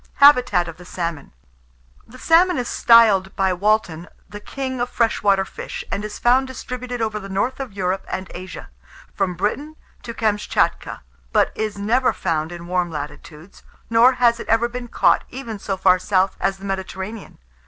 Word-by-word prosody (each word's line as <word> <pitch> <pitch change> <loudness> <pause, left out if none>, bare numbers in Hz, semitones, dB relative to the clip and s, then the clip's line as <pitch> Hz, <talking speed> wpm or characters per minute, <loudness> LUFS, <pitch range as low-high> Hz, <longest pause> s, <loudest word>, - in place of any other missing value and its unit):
HABITAT 250 -11 +5
OF 165 - -8
THE 180 - -13
SALMON. 170 -5 -5 0.8
The 250 - -14
salmon 340 +5 +4
is 245 -1 -2
styled 215 -5 +4
by 190 -1 +1
Walton 180 -4 0 0.2
the 205 - -9
"king 260 +3 -5
of 245 - -1
fresh 230 -2 0
water 195 -1 +3
fish," - - -7
and 200 - -2
is 210 0 -6
found 255 +2 +3
distributed 250 -2 -5
over 215 -1 -2
the 195 -1 -9
north 200 +8 -1
of 265 -6 -6
Europe 190 0 -2
and 190 0 -4
Asia, 185 +1 -9 0.4
from 190 -3 -1
Britain 290 - -3 0.3
to 235 - -8
Kamschatka, 210 - -1 0.3
but - - +2
is 215 -2 -3
never 235 +6 +1
found 160 -2 -2
in 170 0 -8
warm 180 0 -1
latitudes, 150 +3 -9 0.3
nor 235 +3 +6
has 240 -2 +2
it - - -7
ever 225 +2 +2
been 245 0 -7
caught - - +2
even 235 -5 -7
so 195 0 -3
far 185 -1 +4
south 190 0 +1
as 195 - 0
the 195 - -11
Mediterranean. 195 +2 -6
205 Hz, 175 wpm, -21 LUFS, 185-240 Hz, 0.8 s, nor